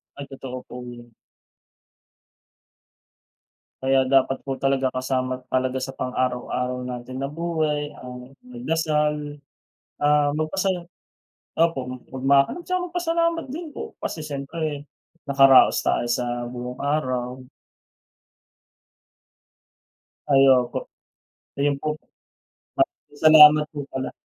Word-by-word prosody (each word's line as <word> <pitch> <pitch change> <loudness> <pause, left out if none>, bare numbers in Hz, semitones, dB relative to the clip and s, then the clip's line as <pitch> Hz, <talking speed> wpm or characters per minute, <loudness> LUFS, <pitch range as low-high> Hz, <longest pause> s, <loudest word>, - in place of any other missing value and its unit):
Ay, 140 - -7
totoo 130 -2 -7
po 125 - -10
yan. 120 -1 -11 2.7
Kaya 135 0 +3
dapat 135 0 +3
po 135 -1 -4
talaga 135 -1 +1
kasama 130 0 -2
talaga 130 0 0
sa 135 0 -5
pang-araw-araw 125 0 -2
natin 125 +1 -6
na 140 - -2
buhay 155 -3 -1
ang 125 +1 -10
magdasal, 150 -10 -1 0.6
ah, 145 0 +3
magpasala 180 +2 -1 0.7
opo, 165 -4 +1 0.3
magmakom 135 - +2
saka 365 +1 -1
magpasalamat 335 -1 0
din 330 +2 -6
po - - -6
kasi 155 - -4
siyempre 145 0 -4 0.4
nakaraos 135 -1 +6
tayo 120 - +1
sa 120 0 -2
buong 125 0 -7
araw. 130 -3 -2 2.9
Ay, 135 - +6
opo. 125 -1 -2 0.7
Ayun 145 0 +2
po. 150 +2 -3 0.8
Na - - +5 0.4
salamat 155 -1 +8
po 145 - -4
pala, 130 0 -3
135 Hz, 100 wpm, -23 LUFS, 130-155 Hz, 2.9 s, salamat